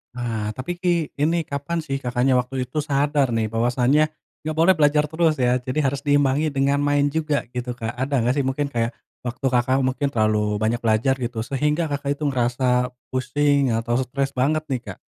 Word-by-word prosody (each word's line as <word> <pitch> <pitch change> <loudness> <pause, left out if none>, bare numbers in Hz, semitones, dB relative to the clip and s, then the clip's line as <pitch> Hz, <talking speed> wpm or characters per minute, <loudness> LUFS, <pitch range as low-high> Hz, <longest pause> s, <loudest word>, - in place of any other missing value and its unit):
Wah, 110 -3 -2
tapi 130 +9 -5
ki 175 -3 -1
ini 160 +2 0
kapan 145 +4 -3
sih 145 -4 -3
Kakaknya 125 0 +1
waktu 125 0 -1
itu 150 +3 -2
sadar 145 -2 +1
nih 115 -1 0
bahwasannya 125 +7 +2 0.3
nggak 155 0 -3
boleh 180 +3 +6
belajar 150 -1 +3
terus 160 -1 +1
ya, 125 0 +3
jadi 130 +4 -2
harus 140 +1 -2
diimbangi 145 +1 +2
dengan 140 +1 +1
main 145 0 +2
juga 155 -3 0
gitu, 125 0 -3
Kak. 115 -1 -4
Ada 135 +1 0
nggak 125 - +3
sih 140 - +1
mungkin 135 +2 -1
kayak 115 0 +1 0.3
waktu 125 +2 -5
Kakak 125 +2 +2
mungkin 135 +2 0
terlalu 105 -2 +1
banyak 115 +2 0
belajar 115 +4 +2
gitu 120 -1 -3
sehingga 150 +4 0
Kakak 145 -1 -2
itu - - -4
ngerasa 125 -1 +1 0.2
pusing 140 +1 +2
atau 115 +1 0
stres 135 +2 -2
banget 150 +5 +1
nih, 130 -4 -2
Kak? - - -11
135 Hz, 185 wpm, -23 LUFS, 125-145 Hz, 0.3 s, boleh